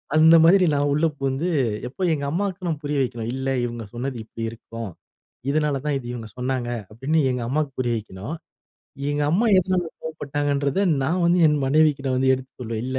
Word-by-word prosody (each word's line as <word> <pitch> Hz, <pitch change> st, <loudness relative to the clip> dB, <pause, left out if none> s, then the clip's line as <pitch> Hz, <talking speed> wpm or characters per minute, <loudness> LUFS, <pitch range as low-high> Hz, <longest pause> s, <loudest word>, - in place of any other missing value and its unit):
அந்த 160 Hz, +1 st, +7 dB
மாதிரி 185 Hz, +2 st, +6 dB
நான் 145 Hz, 0 st, +1 dB
உள்ள 155 Hz, +3 st, +2 dB
புகுந்து, 135 Hz, +6 st, -1 dB, 0.4 s
இப்ப 180 Hz, +9 st, -3 dB
எங்க 140 Hz, -2 st, -2 dB
அம்மாக்கு 185 Hz, 0 st, -2 dB
நான் 155 Hz, -2 st, -2 dB
புரிய 145 Hz, 0 st, -1 dB
வைக்கணும். 120 Hz, -3 st, -2 dB
"இல்ல, 135 Hz, 0 st, -3 dB, 0.2 s
இவங்க 120 Hz, -1 st, -5 dB
சொன்னது 125 Hz, +1 st, -4 dB
இப்பிடி 115 Hz, +1 st, -8 dB
இருக்கும். 115 Hz, -2 st, -8 dB, 0.6 s
இதனால 150 Hz, -2 st, +1 dB
தான் 145 Hz, -2 st, +1 dB
இது 120 Hz, -, -9 dB
இவங்க 115 Hz, -2 st, -6 dB
சொன்னாங்க" 125 Hz, -1 st, -2 dB, 0.2 s
அப்டீன்னு 140 Hz, +8 st, 0 dB
எங்க 125 Hz, -1 st, -2 dB
அம்மாக்கு 150 Hz, 0 st, 0 dB
புரிய 120 Hz, -2 st, +1 dB
வைக்கணும். 105 Hz, -, -7 dB, 0.8 s
எங்க 145 Hz, 0 st, 0 dB
அம்மா 215 Hz, +8 st, +2 dB
எதனால 185 Hz, -1 st, +1 dB, 0.2 s
கோவப்பட்டாங்கன்றத 145 Hz, 0 st, -1 dB, 0.2 s
நான் 170 Hz, +6 st, 0 dB
வந்து 175 Hz, +1 st, +4 dB
என் 150 Hz, -1 st, +2 dB
மனைவிக்கிட 145 Hz, -1 st, +3 dB
வந்து 130 Hz, 0 st, +3 dB
எடுத்து 130 Hz, +1 st, -8 dB
சொல்வேன். 115 Hz, -1 st, -3 dB
"இல்ல. 130 Hz, 0 st, -2 dB
140 Hz, 175 wpm, -23 LUFS, 125-155 Hz, 0.8 s, அந்த